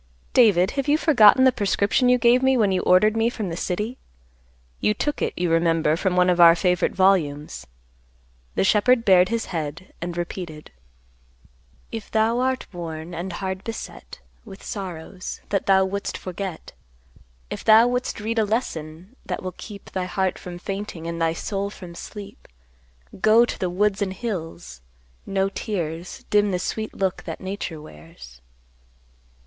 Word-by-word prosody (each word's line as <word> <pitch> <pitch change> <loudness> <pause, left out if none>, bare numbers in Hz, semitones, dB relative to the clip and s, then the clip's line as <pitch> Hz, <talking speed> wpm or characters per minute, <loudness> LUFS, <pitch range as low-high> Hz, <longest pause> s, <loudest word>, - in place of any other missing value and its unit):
"David, 200 -6 +5
have 275 0 -3
you 295 +1 +4
forgotten 260 -6 +6
the 260 - +6
prescription 205 +4 +1
you 250 - +5
gave 240 +1 +4
me 265 0 +3
when 210 -4 +3
you 185 - +1
ordered 210 +4 +4
me 225 +1 +2
from 215 -5 -4
the 165 - -4
city? 210 +8 -3 0.8
You 210 - +1
took 295 +7 -2
it - - 0
you 175 -1 0
remember 165 -2 +2
from 185 +1 -1
one 180 0 +4
of 180 -1 +2
our 170 -1 +9
favorite 180 0 +1
volumes." 150 - +1 0.9
The - - +2
shepherd 230 +4 +3
bared 185 -1 +5
his 230 -1 -1
head 160 +2 -5
and 175 0 -4
repeated, 170 -3 -6 1.2
"If 225 -2 -6
thou 225 +2 +2
art 260 0 0
worn 165 -1 -6
and 175 +2 -4
hard 190 +1 -4
beset, 230 - -8 0.2
With 195 -4 -12
sorrows, 185 -1 -6
that 200 - -1
thou 190 -1 +5
wouldst 200 +1 -3
forget; 185 -2 -6 0.8
If - - -5
thou 220 +1 +7
wouldst 250 -2 -2
read 225 +2 -1
a - - +4
lesson, 185 -3 -4
that - - -4
will 185 -1 -4
keep 200 -2 -11
Thy 185 -1 -2
heart 190 0 -1
from 175 -1 -8
fainting 195 -2 -6
and 170 0 -4
thy 165 0 +2
soul 200 +3 -3
from 180 -4 -11
sleep, 200 +3 -10 0.7
Go 225 +2 +6
to - - -6
the 185 - -1
woods 200 +2 0
and 190 -2 -1
hills! 175 - -6 0.5
No 195 0 +1
tears 175 -5 -5
Dim 205 0 +4
the 185 - 0
sweet 215 +4 -4
look 190 -1 -1
that - - -6
Nature 190 -4 -5
wears." 75 - -14
190 Hz, 165 wpm, -23 LUFS, 175-215 Hz, 1.2 s, our